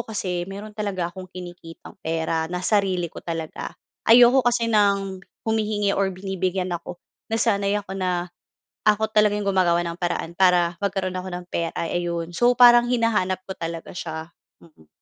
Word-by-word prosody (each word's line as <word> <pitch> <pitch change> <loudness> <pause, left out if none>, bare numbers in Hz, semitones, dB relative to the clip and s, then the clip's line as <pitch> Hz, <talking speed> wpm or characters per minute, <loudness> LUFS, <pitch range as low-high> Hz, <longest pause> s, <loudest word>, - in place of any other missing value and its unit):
kasi 185 -5 -2
mayro'n 205 +2 -8
talaga 190 -5 -2
akong 185 0 -9
kinikitang 175 -3 -10
pera 160 0 -1
na 180 0 -3
sarili 190 -5 +1
ko - - -9
talaga. 165 -2 -5 0.4
Ayoko 245 +3 +7
kasi 240 -1 +2
ng 200 -3 +2 0.3
humihingi 210 -2 +1
or 195 -1 +1
binibigyan 185 -1 -2
ako. 175 +1 -7 0.3
Nasanay 205 -3 +1
ako 190 -1 -9
na, 180 -2 -1 0.6
ako 215 +1 +3
talagang 210 -1 +3
yung 200 - -1
gumagawa 175 -2 +3
ng 170 - -4
paraan 175 -1 -2
para 180 -2 +3
magkaroon 190 -2 -1
ako 185 +1 -5
ng 180 0 -5
pera, 170 -1 -2
ay 170 +1 -1
ayun. 170 -1 -3
So, 240 +1 +4
parang 240 -1 +8
hinahanap 215 -6 +1
ko - - -2
talaga 165 0 -5
siya. 160 -1 -5 0.3
Mm. 150 - -21
185 Hz, 160 wpm, -23 LUFS, 175-210 Hz, 0.6 s, parang